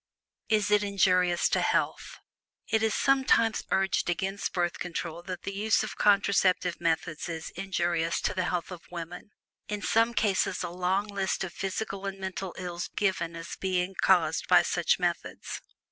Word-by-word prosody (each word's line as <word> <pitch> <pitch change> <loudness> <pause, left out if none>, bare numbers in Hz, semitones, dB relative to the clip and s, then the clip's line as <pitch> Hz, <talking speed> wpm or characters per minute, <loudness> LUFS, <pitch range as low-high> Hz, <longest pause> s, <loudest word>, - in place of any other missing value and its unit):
IS 210 -2 +2
IT 210 0 +5
INJURIOUS 185 -3 +3
TO - - +1
HEALTH? - - 0 0.5
It 220 0 +3
is 220 -1 +1
sometimes 260 -5 +3
urged 195 -2 +1
against 190 +3 -2
Birth 175 -1 -1
Control 170 -1 -4
that 180 0 -7
the 200 - -4
use 215 +3 +2
of 215 - -5
contraceptive 195 -3 +3
methods 165 0 -1
is 160 -1 -5
injurious 175 -3 -1
to - - 0
the 185 -1 -1
health 175 0 -2
of 180 -2 -7
women, 175 +2 -7 0.4
in 210 -1 -4
some 230 +1 +2
cases 200 -4 +1
a - - -3
long 185 +3 0
list 200 -2 -2
of 185 - -5
physical 195 0 -3
and 195 0 -4
mental 190 -1 -5
ills 175 -1 -4
being - - -32
given 185 -4 0
as 165 0 -7
possible - - -5
of - - -43
being 185 0 0
caused 165 -4 +3
by - - +6
such - - +1
methods. - - -3
190 Hz, 175 wpm, -28 LUFS, 175-200 Hz, 0.5 s, by